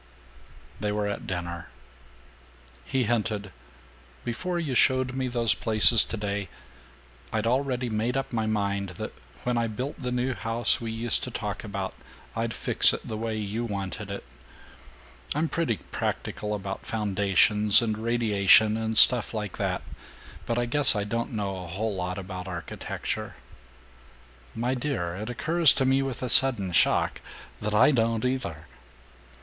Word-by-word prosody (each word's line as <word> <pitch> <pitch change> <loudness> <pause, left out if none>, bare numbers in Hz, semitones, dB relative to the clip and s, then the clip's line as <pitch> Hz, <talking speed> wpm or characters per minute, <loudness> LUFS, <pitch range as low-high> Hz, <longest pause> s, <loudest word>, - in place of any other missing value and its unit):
VI 105 - -3
They - - 0
were 105 0 -1
at 105 - -5
dinner. 85 -4 -5 1.2
He 130 -1 0
hinted, 105 -3 -2 0.7
"Before 175 +10 -3
you 155 -6 -2
showed 130 +1 +2
me 130 0 -2
those 120 -2 +2
places 110 +1 +6
today, 100 -3 -4 0.8
I'd 110 0 -1
already 125 0 0
made 115 +3 -1
up 135 -2 -4
my 110 -2 -1
mind 100 -2 -1
that - - -6 0.3
when 120 -1 0
I 115 - 0
built 125 +7 -5
the 125 -1 -3
new 125 +1 -1
house 115 +1 +1
we 115 -1 -4
used 115 0 +1
to - - -6
talk - - -5
about, - - -5 0.4
I'd 115 0 -2
fix - - +3
it - - -6
the 110 - -4
way 110 0 -3
you 105 +2 -3
wanted 100 -5 -5
it. - - -6 1.1
I'm 155 +2 0
pretty 160 -10 -1
practical 105 0 -3
about 100 -1 -6
foundations 105 0 +4
and 110 -2 -1
radiation 110 -2 +3
and 110 0 -2
stuff 120 -2 +8
like 105 -3 -5
that, - - -2 0.6
but 115 - -1
I 120 - +1
guess 140 +3 +3
I 105 - -1
don't 115 +4 -3
know 100 -3 -3
a - - -9
whole 105 +6 -3
lot 90 0 -4
about 95 -1 -7
architecture." 85 -2 -5 1.2
"My 120 +3 -1
dear, 120 -10 -3
it 105 +5 -6
occurs 160 +5 +4
to 135 - 0
me 135 +1 +3
with 135 -2 -4
a - - -1
sudden 115 -8 +3
shock 85 - +2 0.4
that 105 0 -2
I 125 +7 +6
don't 115 -2 0
either!" 125 -12 -3
110 Hz, 155 wpm, -26 LUFS, 100-125 Hz, 1.2 s, stuff